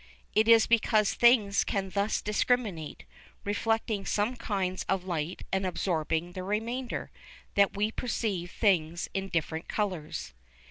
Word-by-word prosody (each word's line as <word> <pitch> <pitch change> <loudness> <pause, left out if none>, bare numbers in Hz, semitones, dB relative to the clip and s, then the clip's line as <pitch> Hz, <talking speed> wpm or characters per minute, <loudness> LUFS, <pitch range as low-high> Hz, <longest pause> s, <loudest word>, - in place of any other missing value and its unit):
It 220 +1 +3
is 230 -1 +7
because 215 -2 +3
things 235 -5 +4
can 195 -1 -2
thus 200 +2 0
discriminate, 210 -6 -1 0.4
reflecting 215 0 0
some 210 +6 0
kinds 195 -6 -2
of 195 -2 +1
light 170 -2 -3
and 190 0 +1
absorbing 170 -2 -1
the 185 - -6
remainder, 225 +6 -3 0.4
that 200 0 +3
we 210 +2 +1
perceive 210 -7 -2
things 170 -6 +1
in 195 0 -2
different 160 -1 -2
colours. 180 - -3
200 Hz, 130 wpm, -29 LUFS, 180-220 Hz, 0.4 s, is